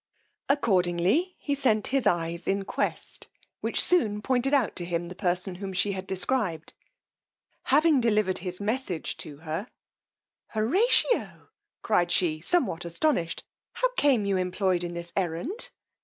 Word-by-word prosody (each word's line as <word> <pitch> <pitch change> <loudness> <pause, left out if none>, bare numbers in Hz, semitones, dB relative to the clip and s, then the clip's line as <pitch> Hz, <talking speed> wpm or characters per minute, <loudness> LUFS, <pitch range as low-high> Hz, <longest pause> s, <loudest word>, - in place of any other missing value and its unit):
Accordingly 200 - +2
he 285 - -2
sent 235 -7 +1
his 275 -2 +2
eyes 170 0 -1
in 195 0 0
quest, - - -4 0.3
which - - -1
soon 220 -13 +2
pointed 260 0 +1
out 275 -7 +2
to 175 - -1
him 170 0 -3
the - - -7
person 180 0 -1
whom 195 -1 -4
she 185 +3 +1
had 190 -1 -5
described: 185 -4 -2 0.9
having 300 0 +4
delivered 210 -5 +2
his 180 0 -4
message 205 -4 -2
to 145 -2 -8
her; 160 +8 -3 0.9
Horatio! 380 - +2 0.3
cried 175 -5 +2
she, 160 -3 +1
somewhat 205 - +1
astonished, 170 - -1 0.3
how - - +1
came 265 - +3
you 200 -1 +1
employed 185 0 0
in 175 0 -5
this 170 0 -7
errand? 195 - -1
195 Hz, 140 wpm, -27 LUFS, 175-260 Hz, 0.9 s, having